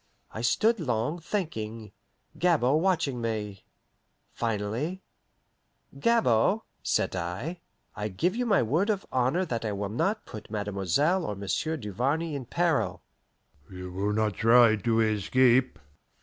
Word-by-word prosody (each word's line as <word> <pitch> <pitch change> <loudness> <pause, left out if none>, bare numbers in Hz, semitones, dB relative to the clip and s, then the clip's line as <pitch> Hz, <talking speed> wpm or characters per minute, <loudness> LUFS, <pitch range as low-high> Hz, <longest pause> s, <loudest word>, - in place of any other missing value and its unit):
I 110 - -6
stood 215 - +2
long, 125 +2 -1
thinking, 115 - -4 0.4
Gabord 155 -4 +2
watching 165 -9 0
me. 105 -4 -4 0.7
Finally, 115 - -2 1.0
"Gabord," 210 - +3 0.2
said - - 0
I, 95 - -4 0.4
"I 105 - -3
give 170 - -1
you 245 0 -1
my 200 - +4
word 160 - +1
of 205 -2 0
honour 130 +9 +1
that 115 -8 -3
I 110 -2 -2
will 100 0 -3
not 195 - -1
put 110 - -10
Mademoiselle 105 - 0
or 105 - -3
Monsieur 100 +11 -2
Duvarney 135 - -1
in 140 -3 -4
peril." 170 +3 0 0.7
"You 90 -1 -8
will 100 +3 -1
not 110 -1 +1
try 115 +1 +5
to 115 +2 +1
escape?" 120 +4 +3
120 Hz, 130 wpm, -28 LUFS, 105-165 Hz, 1.0 s, try